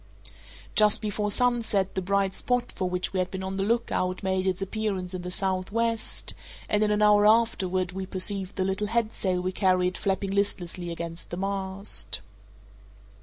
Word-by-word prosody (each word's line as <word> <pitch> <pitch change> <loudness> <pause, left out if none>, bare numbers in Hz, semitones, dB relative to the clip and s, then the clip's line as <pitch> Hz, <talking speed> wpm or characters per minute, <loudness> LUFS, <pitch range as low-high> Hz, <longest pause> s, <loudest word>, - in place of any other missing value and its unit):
Just 210 -1 +5
before 210 -1 -2
sunset 225 -4 +2
the 190 - -1
bright 195 +1 +1
spot 245 +2 -1
for 185 - -2
which 180 +1 -1
we 190 - 0
had 180 0 0
been 190 0 -5
on 190 0 -4
the - - 0
look 230 +4 0
out 185 +2 -1
made 190 0 0
its 185 0 0
appearance 195 -2 -3
in 185 - -4
the 180 - -5
southwest, 200 +5 0 0.3
and 210 0 +2
in 210 - +2
an 210 0 +2
hour 210 0 +6
afterward 190 -5 +2
we 190 0 -5
perceived 190 0 -1
the 185 - 0
little 195 +2 -1
headsail 215 -5 0
we 185 - -1
carried 185 -2 +2
flapping 195 0 -1
listlessly 185 -3 -1
against 170 0 -6
the 175 - -5
mast. 190 - 0
195 Hz, 170 wpm, -27 LUFS, 185-210 Hz, 0.3 s, hour